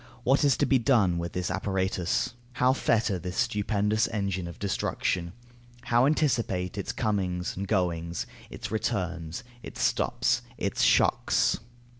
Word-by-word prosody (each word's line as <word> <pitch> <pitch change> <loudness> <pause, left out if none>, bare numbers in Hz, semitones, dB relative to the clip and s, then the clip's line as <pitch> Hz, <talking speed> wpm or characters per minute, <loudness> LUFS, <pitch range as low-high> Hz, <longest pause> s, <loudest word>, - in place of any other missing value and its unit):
What 135 +4 +3
is 140 -3 +4
to - - +2
be 135 - +3
done 110 -9 +3
with 85 0 -4
this 90 0 -2
apparatus? 95 0 -1 0.2
How 125 +2 +3
fetter 115 -6 +1
this 90 +2 -6
stupendous 105 -2 +1
engine 100 -4 -2
of 85 - -8
destruction? 90 -3 -1 0.5
How 120 +3 +3
anticipate 120 - 0
its 100 - -3
comings 95 -5 -1
and 100 +1 -4
goings, 85 -4 -1 0.2
its - - -7
returns, 90 -3 -2 0.2
its - - -9
stops, - - +1 0.2
its - - -1
shocks? - - +3
100 Hz, 135 wpm, -28 LUFS, 90-115 Hz, 0.5 s, is